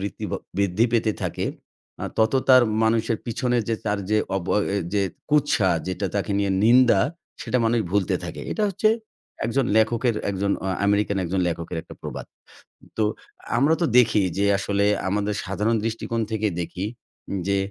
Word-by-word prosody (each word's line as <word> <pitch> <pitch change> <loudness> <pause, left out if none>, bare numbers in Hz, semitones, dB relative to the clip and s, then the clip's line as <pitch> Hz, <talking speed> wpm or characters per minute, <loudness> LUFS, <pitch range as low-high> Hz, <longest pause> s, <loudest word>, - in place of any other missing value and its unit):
বৃত্তি 100 -2 -5
বা - - -1 0.2
বৃদ্ধি 100 +3 +2
পেতে 110 -2 +2
থাকে - - -2 0.6
আ - - -1
তত 110 +2 +3 0.2
তার 130 -1 +8 0.2
মানুষের 115 0 +2
পিছনে 120 +2 0
যে 115 - +2
তার 105 -1 0
যে 110 - +4 0.2
অবয় 95 +2 0 0.3
যে 100 - +3 0.3
কুৎসা 145 -10 +3 0.2
যেটা 95 +2 -2
তাকে 100 +1 -1
নিয়ে 100 -1 +1
নিন্দা 120 -2 +6 0.4
সেটা 125 - 0
মানুষ 115 +1 +2
ভুলতে 100 -2 +1
থাকে। - - -6
এটা 215 - -2
হচ্ছে 205 +3 +2 0.6
একজন 130 +4 +1
লেখকের, 115 +2 +2 0.2
একজন 100 +1 -1
অ - - -2 0.2
আমেরিকান 100 0 +2
একজন 95 +2 -1
লেখকের 85 0 -4
একটা - - -12
প্রবাদ। - - -6 0.7
তো 110 - +2 0.5
আমরা 145 +5 +4
তো - - +4
দেখি 115 -4 +5 0.2
যে 100 - +2
আসলে 100 0 0 0.2
আমাদের 105 +1 0
সাধারণ 105 +4 0
দৃষ্টিকোণ 115 0 -2
থেকে 110 -1 0
দেখি 90 +3 -4 0.6
যে 100 0 +2
105 Hz, 160 wpm, -24 LUFS, 100-115 Hz, 0.7 s, তার